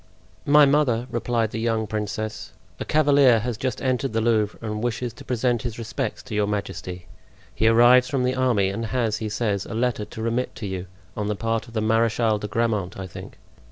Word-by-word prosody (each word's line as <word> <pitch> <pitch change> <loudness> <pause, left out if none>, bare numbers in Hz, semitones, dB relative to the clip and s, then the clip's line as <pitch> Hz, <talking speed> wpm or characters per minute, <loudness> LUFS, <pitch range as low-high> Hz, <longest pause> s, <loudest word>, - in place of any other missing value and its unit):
"My 150 +1 +7
mother," 135 -5 +2
replied 115 -2 0
the 115 - -4
young 115 -1 0
princess, 110 +1 -4 0.3
"a - - -4
cavalier 140 -5 +5
has 120 +1 -2
just 130 +3 -3
entered 130 -1 0
the 115 - +1
Louvre 110 -2 +1
and 105 -1 -4
wishes 120 0 -2
to - - -12
present 120 -1 0
his 115 -1 -5
respects 115 0 -4
to 125 - -9
your 105 -1 +1
majesty; 90 -3 -4 0.5
he 110 - +1
arrives 120 +2 +6
from 135 -3 0
the 125 0 +1
army 125 -7 +2
and 110 +4 -3
has, 115 -3 0
he 110 - -4
says, 105 -2 -1
a 110 - -6
letter 120 -2 0
to 110 +1 -9
remit 115 +2 -1
to 110 - -6
you, 95 -1 -4 0.3
on 105 -1 -2
the 105 - -1
part 115 +2 -2
of 115 - -14
the 110 - +1
Marechal 115 0 +2
de 105 - -4
Grammont, 105 -4 -1
I 95 - -5
think." 90 - -10
115 Hz, 205 wpm, -24 LUFS, 105-125 Hz, 0.5 s, My